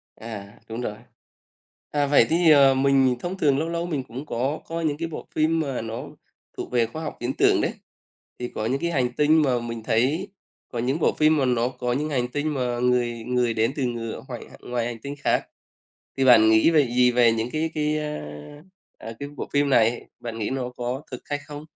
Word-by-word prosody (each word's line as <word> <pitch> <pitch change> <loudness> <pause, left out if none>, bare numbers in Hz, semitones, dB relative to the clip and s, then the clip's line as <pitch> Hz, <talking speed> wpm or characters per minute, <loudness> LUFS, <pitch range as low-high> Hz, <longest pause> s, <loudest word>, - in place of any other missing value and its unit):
À, 105 -3 -9
đúng 115 +2 -4
rồi. 105 -4 -3 1.0
À, 145 -1 +1
vậy 140 -4 +5
thì, 165 0 +4
ờ, 140 -2 +7
mình 135 -1 +3
thông 175 +7 -4
thường 145 -6 +3
lâu 160 +2 -2
lâu 170 0 -2
mình 150 -6 -2
cũng 130 +4 -8
có 135 +3 -2
coi 165 0 -3
những 145 -2 0
cái 165 +1 -3
bộ 160 - -8
phim 160 +1 +2
mà 140 -6 -2
nó 115 0 -5 0.5
thuộc - - -6
về 120 -2 +3
khoa 155 +8 -7
học 155 - -5
viễn 120 +2 -1
tưởng - - +4
đấy, - - 0 0.7
thì 125 - -3
có 110 - -2
những 130 +4 0
cái 170 - 0
hành 125 -5 +1
tinh 155 +3 +4
mà 130 -4 +2
mình 115 -1 -6
thấy 135 - +1 0.4
có 120 - -3
những 130 +6 0
bộ - - +2
phim 155 0 +3
mà 135 - +2
nó 120 -1 +2
có 125 -1 -3
những 150 +4 -1
hành 125 -4 0
tinh 145 +4 -2
mà 125 -3 -1
người 120 -2 +1
người 125 -2 +1
đến 115 +2 +1
từ 140 - -2
ngừa 115 -2 -3
hoài - - -7
h - - -16
ngoài 120 -1 -1
hành 120 -1 -5
tinh 140 0 -6
khác - - +1 0.7
thì 135 - +1
bạn 110 -4 +7
nghĩ 110 +8 +5
về 150 -4 +4
gì 125 +1 +4
về 120 -1 +4
những 115 +1 -1
cái 160 +1 -1
cái, 150 0 0
a, 150 0 -3 0.8
à, 115 - -7
cái 140 - -5
bộ - - -5
phim 145 0 +2
này, 115 -2 +3 0.2
bạn 115 -1 -6
nghĩ 105 - -2
nó 130 -2 -2
có 125 +3 -3
thực 125 - -7
hay 145 - -1
không 145 +1 -9
130 Hz, 225 wpm, -24 LUFS, 120-150 Hz, 1.0 s, ờ